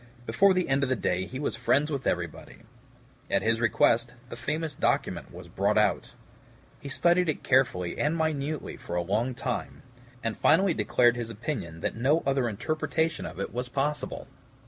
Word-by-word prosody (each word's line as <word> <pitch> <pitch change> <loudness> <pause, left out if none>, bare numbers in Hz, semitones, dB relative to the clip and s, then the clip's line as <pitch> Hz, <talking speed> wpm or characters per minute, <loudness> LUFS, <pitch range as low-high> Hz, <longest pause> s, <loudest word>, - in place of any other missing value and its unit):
Before 195 +5 +4
the 185 -1 +1
end 135 +1 +2
of 140 - +1
the 130 - +2
day 90 -3 -1
he 130 - -6
was 140 - -2
friends 140 +6 +2
with 140 -2 -2
everybody. 85 -2 -4 0.7
At - - +1
his 115 +1 +1
request, 120 +1 +2
the - - -6
famous 150 +5 -3
document - - -1
was - - -10
brought 100 +2 0
out. 105 - +1 0.6
He 140 - -8
studied 175 +4 +3
it 150 - -2
carefully 125 -10 +1
and 150 +3 +1
minutely 155 -2 -2
for 85 - -6
a 90 - 0
long 110 +8 0
time, 125 0 -4 0.4
and 115 -2 -1
finally 190 -2 +4
declared 120 +2 +3
his 120 -1 -4
opinion 105 - -5
that - - -2
no 140 +8 +2
other 135 -3 +1
interpretation 155 +8 -1
of - - -9
it 100 - -4
was 125 +1 -3
possible. 145 +3 -2
130 Hz, 175 wpm, -28 LUFS, 110-150 Hz, 0.7 s, Before